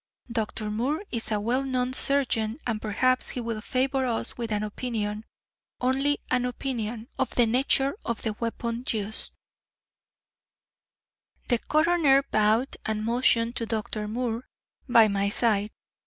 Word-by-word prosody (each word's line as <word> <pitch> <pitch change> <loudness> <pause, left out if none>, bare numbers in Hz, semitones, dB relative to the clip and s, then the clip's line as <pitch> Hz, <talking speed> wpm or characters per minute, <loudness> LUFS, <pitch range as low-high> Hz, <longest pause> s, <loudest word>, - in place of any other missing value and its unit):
Dr. 215 -2 -2
Moore 265 - -1
is 230 -1 -1
a 210 - +1
well 240 +6 0
known 255 -1 -1
surgeon, 245 -5 +1
and 220 -3 -1
perhaps 255 +4 +2
he - - -3
will 230 -2 -3
favor 265 +2 0
us 230 -2 -1
with 230 -2 -4
an 210 0 0
opinion 215 -1 -3 0.5
only 270 +3 +2
an 250 -1 +2
opinion 235 -3 -3
of 265 - +1
the 240 - +5
nature 270 +5 +2
of 235 -2 -3
the 220 - -1
weapon 235 +1 -3
used." 215 -1 -1 2.2
The 240 - +3
coroner 310 -3 +3
bowed 220 +1 +2
and 215 0 -2
motioned 235 0 +2
to 230 - -2
Dr. 215 -1 -2
Moore, 235 +1 -3 0.4
by 230 -2 +7
my 200 -1 +1
side. 210 -1 +1
235 Hz, 140 wpm, -27 LUFS, 215-255 Hz, 2.2 s, by